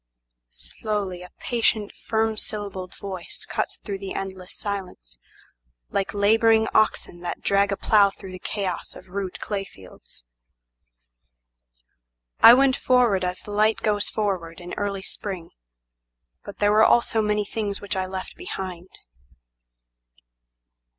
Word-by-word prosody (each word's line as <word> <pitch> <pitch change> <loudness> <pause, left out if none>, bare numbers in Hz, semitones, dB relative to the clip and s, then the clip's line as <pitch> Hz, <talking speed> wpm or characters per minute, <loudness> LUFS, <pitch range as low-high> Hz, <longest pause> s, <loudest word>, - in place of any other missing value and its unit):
Slowly 185 - -4
a 180 - -10
patient, 225 -3 0
firm 220 0 0
syllabled 200 -4 -5
voice 190 -3 -6
cuts - - -2
through 200 -3 -5
the 195 -1 -6
endless 190 -1 -6
silenceLike - - -6
labouring 220 +2 +4
oxen 215 -4 +2
that 175 - -5
drag 200 0 +2
a 200 - -1
plow 205 -2 +5
through 190 -1 -11
the 185 - -8
chaos 190 -4 -3
of - - -13
rude 190 -1 -4
clay 200 -2 -2
fields:"I - - -2
went 265 0 +4
forward 240 -7 +3
as 180 0 -2
the 210 - -9
light 215 +1 +2
goes 205 -1 +1
forward 185 -6 -2
in 175 0 -8
early 200 -1 -2
spring, 190 -5 -6 0.9
But 200 - -9
there 205 0 +3
were 215 +1 +5
also 230 -1 +4
many 210 -1 +1
things 205 -1 -3
which 200 -3 -3
I 185 0 -1
left 185 0 -6
behind. 185 - -6
195 Hz, 125 wpm, -24 LUFS, 165-210 Hz, 0.9 s, plow